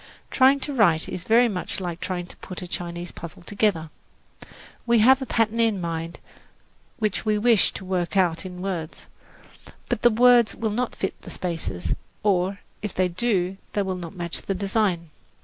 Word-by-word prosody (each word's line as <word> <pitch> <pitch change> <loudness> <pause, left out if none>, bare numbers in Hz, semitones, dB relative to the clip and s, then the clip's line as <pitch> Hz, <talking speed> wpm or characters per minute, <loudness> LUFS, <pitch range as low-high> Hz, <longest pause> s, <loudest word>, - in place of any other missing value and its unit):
Trying 270 +1 +5
to 290 - -3
write 175 -10 +3
is 180 -2 -5
very 235 +2 +5
much 190 -4 -3
like 175 -2 -4
trying 180 -2 -3
to - - -13
put 185 -1 -7
a - - -7
Chinese 175 0 -5
puzzle 170 0 -9
together. 190 -5 0 1.0
We 235 0 +5
have 260 +5 +6
a 265 - -4
pattern 225 0 +1
in 225 -4 +3
mind 165 -1 -4 0.8
which 215 -5 -1
we 215 -1 +1
wish 225 -1 +4
to 190 - -7
work 185 0 -1
out 175 -2 +2
in 180 -1 -7
words; 175 -5 -4 0.8
but 245 -3 -1
the 240 - +6
words 240 0 +5
will 220 -1 -2
not 245 +3 -2
fit 190 - -4
the - - -10
spaces, 160 - -3 0.3
or, 195 -1 +1 0.2
if 210 -3 -5
they 185 -1 +2
do, 185 -1 0 0.2
they 205 - +1
will 190 -1 -2
not 180 +1 -7
match 170 -2 -2
the 195 - -2
design. 195 -4 0
190 Hz, 180 wpm, -24 LUFS, 175-220 Hz, 1.0 s, have